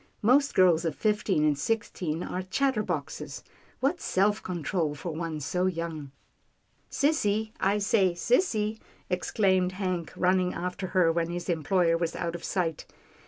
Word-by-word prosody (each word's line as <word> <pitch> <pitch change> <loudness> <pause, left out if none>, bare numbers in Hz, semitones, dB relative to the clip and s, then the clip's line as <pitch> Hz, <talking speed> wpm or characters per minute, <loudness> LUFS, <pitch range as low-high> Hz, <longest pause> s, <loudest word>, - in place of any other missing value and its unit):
" - - -39
Most 280 +1 +3
girls 175 -3 +5
of 160 -3 -1
fifteen 210 -6 +1
and 150 -1 +3
six 225 +9 -1
teen 165 -1 -3
are 185 - -3
chatterboxes. 215 +4 -2 0.4
What 290 +7 +1
self 205 +3 +1
control 165 -3 -2
for 170 +4 -5
one 160 -1 -4
so 180 +6 0
young." 165 -5 -4 0.4
" - - -42
Sissy, 220 -8 +1
I 200 +2 +2
say, 200 -3 +2
sissy," 220 - +1 0.3
exclaimed 185 0 +1
Hank 185 -3 -3
running 185 0 +2
after 180 +2 -3
her, 170 -3 +5
when 165 0 -1
his 175 +1 -5
employer 165 +1 +2
was 165 -1 -2
out 170 -1 -2
of 175 - -7
sight. 170 -5 -2
180 Hz, 155 wpm, -28 LUFS, 165-210 Hz, 0.4 s, girls